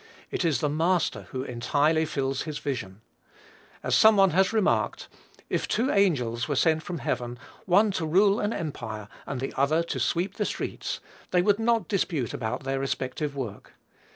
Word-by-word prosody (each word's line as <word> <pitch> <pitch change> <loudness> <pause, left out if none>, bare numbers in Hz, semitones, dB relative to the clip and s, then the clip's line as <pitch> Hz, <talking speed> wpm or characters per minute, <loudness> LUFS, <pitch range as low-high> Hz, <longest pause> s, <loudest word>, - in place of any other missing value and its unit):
It - - -1
is 155 -7 +1
the 150 - +2
Master 165 +4 0
who 130 -1 -4
entirely 145 +6 +1
fills 135 -3 -2
his 155 -1 -4
vision. 110 -8 -4 0.8
As - - -1
some 220 0 +7
one 195 -2 +5
has 190 +3 +3
remarked, 220 -3 +1 0.4
"if - - -1
two 255 +4 +1
angels 125 - +1
were 145 - -1
sent 160 +3 +3
from 175 +2 -5
heaven, 120 -4 -3 0.3
one 200 +4 +5
to 165 -4 -2
rule 195 +5 +4
an 205 - 0
empire, 110 - -5 0.2
and 135 - -3
the 135 - -4
other 155 +5 +2
to 170 - -4
sweep 180 +3 0
the 210 - 0
streets, - - -4 0.3
they 180 -1 +3
would 205 +2 +3
not 230 0 +2
dispute 165 - -1
about 120 +2 -3
their 135 0 -1
respective 135 +2 -3
work." 125 -7 -6
155 Hz, 175 wpm, -27 LUFS, 130-190 Hz, 0.8 s, some